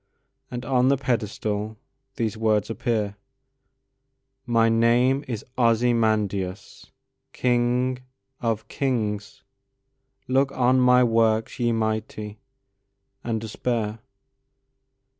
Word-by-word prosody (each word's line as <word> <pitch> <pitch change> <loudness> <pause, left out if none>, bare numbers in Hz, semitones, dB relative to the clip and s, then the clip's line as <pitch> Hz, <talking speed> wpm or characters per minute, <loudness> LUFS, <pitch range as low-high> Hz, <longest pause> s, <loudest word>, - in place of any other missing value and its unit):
And 120 -1 -6
on 130 0 +2
the 140 +1 +4
pedestal 110 -3 -2 0.4
these 115 -3 -1
words 110 -1 +1
appear:"My 130 +2 -4
name 120 +4 +3
is 115 -4 -5
Ozymandias, 110 -5 0 0.4
king 125 +1 +1 0.4
of 110 -2 -2
kings:Look 125 +3 -3
on 130 0 +3
my 125 0 +5
works, 115 -1 +1
ye 120 -1 +2
mighty, 110 -1 -3 0.8
and 115 -2 -1
despair!" 110 0 -3
115 Hz, 80 wpm, -24 LUFS, 110-125 Hz, 0.8 s, my